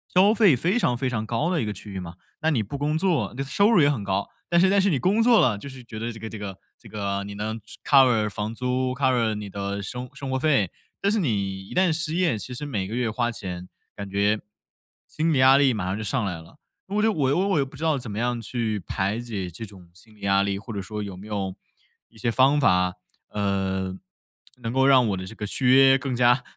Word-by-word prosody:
消 190 Hz, +3 st, +6 dB
费 210 Hz, -, +5 dB
非 175 Hz, -, 0 dB
常 125 Hz, -, +1 dB
非 130 Hz, +2 st, -1 dB
常 110 Hz, -3 st, -2 dB
高 120 Hz, +9 st, -1 dB
的 180 Hz, -3 st, 0 dB
一 -, -, -1 dB
个 105 Hz, -, -3 dB
区 105 Hz, -, -10 dB
域 95 Hz, -, -5 dB
嘛。 85 Hz, -1 st, -8 dB, 0.3 s
那 160 Hz, -, +2 dB
你 130 Hz, -7 st, +1 dB
不 105 Hz, +7 st, -5 dB
工 150 Hz, +2 st, 0 dB
作 160 Hz, -, 0 dB
这 135 Hz, -, -2 dB
收 200 Hz, -, +2 dB
入 215 Hz, -, +5 dB
也 145 Hz, -, +5 dB
很 130 Hz, -8 st, -1 dB
高， 100 Hz, 0 st, -1 dB, 0.2 s
但 170 Hz, 0 st, +3 dB
是 190 Hz, -, +5 dB
但 200 Hz, +1 st, +4 dB
是 200 Hz, +1 st, +3 dB
你 140 Hz, -, +1 dB
工 200 Hz, -, +2 dB
作 235 Hz, -2 st, +6 dB
了， 115 Hz, -5 st, +2 dB
就 105 Hz, -, -9 dB
是 130 Hz, -2 st, -10 dB
觉 115 Hz, -2 st, -9 dB
得 115 Hz, +2 st, -3 dB
这 110 Hz, -, -10 dB
个 110 Hz, 0 st, -6 dB
这 110 Hz, -, -7 dB
个 100 Hz, -2 st, -6 dB, 0.2 s
这 -, -, -16 dB
个 100 Hz, -1 st, -3 dB
你 100 Hz, +1 st, -7 dB
能 110 Hz, +2 st, -4 dB
租 110 Hz, +1 st, -11 dB
cover 125 Hz, -7 st, +4 dB
房 105 Hz, +2 st, -4 dB
租， 125 Hz, +1 st, -1 dB
cover 125 Hz, -4 st, +1 dB
你 105 Hz, -1 st, -6 dB
的 100 Hz, +1 st, -4 dB
生 125 Hz, +5 st, -6 dB
生 140 Hz, -1 st, -7 dB
活 130 Hz, -, 0 dB
费。 130 Hz, -, +2 dB, 0.3 s
但 200 Hz, -, +2 dB
是 220 Hz, -, +1 dB
你 100 Hz, -, -2 dB
一 -, -, -9 dB
旦 185 Hz, -1 st, +3 dB
失 155 Hz, 0 st, -1 dB
业， 175 Hz, -9 st, +1 dB
其 125 Hz, +4 st, -7 dB
实 135 Hz, +4 st, -5 dB
每 105 Hz, -10 st, -3 dB
个 110 Hz, -, -5 dB
月 120 Hz, -2 st, 0 dB
花 120 Hz, +2 st, -1 dB
钱， 90 Hz, -6 st, -6 dB, 0.3 s
感 100 Hz, -1 st, -7 dB
觉 100 Hz, +2 st, +1 dB, 0.7 s
心 160 Hz, +1 st, 0 dB
理 135 Hz, -, +2 dB
压 130 Hz, +1 st, +7 dB
力 140 Hz, -2 st, +4 dB
马 105 Hz, -5 st, -3 dB
上 95 Hz, +2 st, -2 dB
就 110 Hz, -, -4 dB
上 125 Hz, +2 st, -1 dB
来 90 Hz, -5 st, -3 dB
了。 85 Hz, -, -17 dB, 0.3 s
我 205 Hz, +2 st, 0 dB
就 220 Hz, +1 st, +3 dB
我 140 Hz, -7 st, +1 dB
我 190 Hz, +3 st, +1 dB
我 190 Hz, -, +2 dB
又 140 Hz, -, +1 dB
不 135 Hz, -, -13 dB
知 145 Hz, -, -8 dB
道 160 Hz, -3 st, +2 dB
怎 120 Hz, -4 st, -7 dB
么 105 Hz, -, -4 dB
样 120 Hz, 0 st, 0 dB
去 115 Hz, -2 st, -2 dB
排 100 Hz, +3 st, -2 dB
解 105 Hz, -7 st, -4 dB
这 90 Hz, +7 st, -7 dB
种 95 Hz, -4 st, -15 dB
心 110 Hz, +5 st, -19 dB
理 105 Hz, -, -22 dB
压 100 Hz, 0 st, +3 dB
力， 100 Hz, -1 st, -2 dB
或 110 Hz, -, -9 dB
者 100 Hz, -2 st, -3 dB
说 105 Hz, +2 st, -6 dB
有 100 Hz, -3 st, -6 dB
没 95 Hz, -, -11 dB
有 100 Hz, -3 st, -3 dB, 0.5 s
一 -, -, -28 dB
一 -, -, -15 dB
些 120 Hz, -, 0 dB
方 135 Hz, +5 st, +4 dB
法， 90 Hz, -8 st, +3 dB, 0.4 s
呃， 95 Hz, -2 st, -1 dB, 0.7 s
能 115 Hz, -1 st, -3 dB
够 135 Hz, +2 st, +2 dB
让 130 Hz, -3 st, +5 dB
我 95 Hz, -, -1 dB
的 95 Hz, -, -5 dB
这 95 Hz, -, -9 dB
个 105 Hz, -1 st, -5 dB
续 130 Hz, -, +1 dB
约 135 Hz, +1 st, +7 dB
更 135 Hz, -2 st, -3 dB
加 120 Hz, +1 st, +4 dB
115 Hz, 300 characters per minute, -25 LUFS, 100-140 Hz, 0.7 s, 压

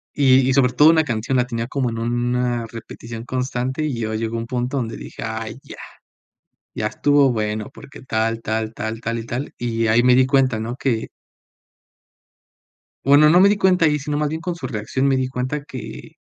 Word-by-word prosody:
y 130 Hz, -2 st, +4 dB
y -, -, +3 dB
sobre 125 Hz, -2 st, +3 dB
todo 150 Hz, +5 st, +6 dB
una 160 Hz, -1 st, +4 dB
canción 130 Hz, 0 st, -1 dB
la 125 Hz, -, +2 dB
tenía 115 Hz, -1 st, -4 dB
como 130 Hz, -2 st, -1 dB
en 115 Hz, -, -5 dB
una 120 Hz, 0 st, -1 dB
repetición 115 Hz, 0 st, -9 dB
constante, 130 Hz, +2 st, -2 dB
y 135 Hz, -6 st, -2 dB
yo 110 Hz, -1 st, -2 dB
llego 115 Hz, +1 st, -2 dB
un 115 Hz, 0 st, -4 dB
punto 125 Hz, +2 st, -2 dB
donde 115 Hz, -3 st, -3 dB
dije: -, -, -9 dB
"Ay 110 Hz, +2 st, -5 dB
ya, -, -, -11 dB, 1.0 s
ya 105 Hz, -, -1 dB
estuvo 145 Hz, +3 st, +3 dB
bueno, 110 Hz, +1 st, -2 dB
porque 140 Hz, 0 st, -13 dB
tal, 115 Hz, -2 st, -1 dB
tal, 110 Hz, 0 st, -2 dB
tal, 110 Hz, +1 st, -5 dB
tal, 115 Hz, 0 st, -2 dB
y 115 Hz, -, -7 dB
tal", 125 Hz, +4 st, -5 dB
y 115 Hz, -1 st, -1 dB
ahí 115 Hz, +2 st, +4 dB
me 125 Hz, 0 st, +5 dB
di 130 Hz, 0 st, +5 dB
cuenta, 130 Hz, -4 st, +2 dB
¿no?, 115 Hz, +2 st, -4 dB
que 130 Hz, -6 st, -1 dB, 2.0 s
bueno, 145 Hz, +2 st, +6 dB
no 175 Hz, +3 st, +6 dB
me 195 Hz, -, +7 dB
di 205 Hz, -, +2 dB
cuenta 185 Hz, -4 st, +3 dB
ahí, 150 Hz, -1 st, +2 dB
sino 145 Hz, +1 st, -3 dB
más 150 Hz, 0 st, 0 dB
bien 160 Hz, +2 st, -4 dB
con 175 Hz, 0 st, -3 dB
su 170 Hz, -, -6 dB
reacción, 130 Hz, +4 st, -2 dB
me 135 Hz, -, +3 dB
di 130 Hz, 0 st, 0 dB
cuenta 130 Hz, +3 st, -3 dB
que 85 Hz, -, -9 dB
125 Hz, 205 wpm, -21 LUFS, 115-140 Hz, 2.0 s, me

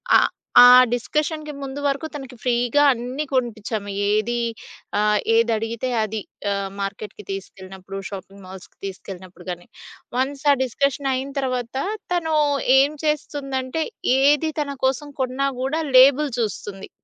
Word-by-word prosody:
ఆహ్, -, -, +5 dB, 0.3 s
ఆ 245 Hz, 0 st, +10 dB, 0.2 s
డిస్కషన్‌కి 300 Hz, +5 st, -2 dB
ముందు 275 Hz, +1 st, -5 dB
వరకు 280 Hz, +3 st, 0 dB
తనకి 265 Hz, -3 st, -8 dB
ఫ్రీగా 245 Hz, +3 st, +2 dB
అన్ని 250 Hz, +5 st, -4 dB
కొనిపిచ్చాము. 220 Hz, -4 st, -2 dB, 0.2 s
ఏది 215 Hz, +3 st, +1 dB, 0.6 s
ఆహ్, 210 Hz, 0 st, +3 dB, 0.2 s
ఏదడిగితే 230 Hz, +1 st, 0 dB
అది. 215 Hz, 0 st, -2 dB, 0.3 s
ఆహ్, 200 Hz, -1 st, -2 dB
మార్కెట్‌కి 205 Hz, +1 st, -6 dB
తీసుకెళ్ళినప్పుడు, 190 Hz, 0 st, -8 dB
షాపింగ్ 195 Hz, 0 st, -9 dB
మాల్స్‌కి 185 Hz, 0 st, -12 dB
తీసుకెళ్ళినప్పుడు 185 Hz, -1 st, -9 dB
గానీ. 175 Hz, 0 st, -6 dB, 0.5 s
వన్స్ 270 Hz, +2 st, -1 dB
ఆ -, -, +7 dB
డిస్కషన్ 275 Hz, +2 st, 0 dB
అయిన 265 Hz, +2 st, -3 dB
తర్వాత, 250 Hz, -3 st, -2 dB, 0.4 s
తను 325 Hz, -3 st, 0 dB, 0.5 s
ఏం 280 Hz, +2 st, +4 dB
చేస్తుందంటే, 285 Hz, -1 st, -2 dB, 0.4 s
ఏది 295 Hz, +3 st, +4 dB
తన 280 Hz, -1 st, -3 dB
కోసం 265 Hz, +3 st, 0 dB
కొన్నా 260 Hz, +2 st, 0 dB
గూడా 270 Hz, +5 st, -1 dB, 0.2 s
లేబుల్ 280 Hz, +3 st, +6 dB
జూస్తుంది. 200 Hz, -2 st, -4 dB
250 Hz, 125 wpm, -22 LUFS, 210-275 Hz, 0.6 s, ఆ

